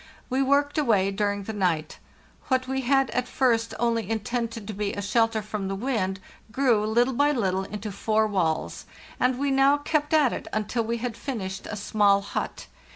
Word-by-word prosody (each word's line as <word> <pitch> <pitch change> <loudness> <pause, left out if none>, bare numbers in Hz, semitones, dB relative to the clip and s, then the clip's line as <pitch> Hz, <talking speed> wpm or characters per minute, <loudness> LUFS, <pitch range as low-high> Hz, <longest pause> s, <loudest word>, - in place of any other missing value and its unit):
We 260 +1 +2
worked 285 +3 +2
away 205 -9 +2
during 205 0 -1
the 220 - -5
night. 175 -6 -1 0.5
What 260 -1 +1
we 265 0 -1
had 270 +1 +2
at 250 - -1
first 230 -4 +1
only 230 -3 0
intended 225 0 -3
to 215 - -4
be 205 0 -2
a 200 - -4
shelter 225 +1 +1
from 210 -2 -4
the 195 - -2
wind 195 -4 -1 0.3
grew, 240 -3 +2
little 240 +4 +2
by 285 +4 +3
little, 190 -7 0
into 210 +1 -6
four 220 +2 +1
walls; 180 -7 -1 0.3
and 250 0 +2
we 280 +1 0
now 270 +1 +4
kept 295 0 -1
at 300 -6 +4
it - - -6
until 215 +2 -1
we 230 +1 -2
had 235 0 -4
finished 195 -8 -5
a - - -5
small 200 -1 +3
hut. 200 - -4
225 Hz, 185 wpm, -26 LUFS, 200-260 Hz, 0.5 s, now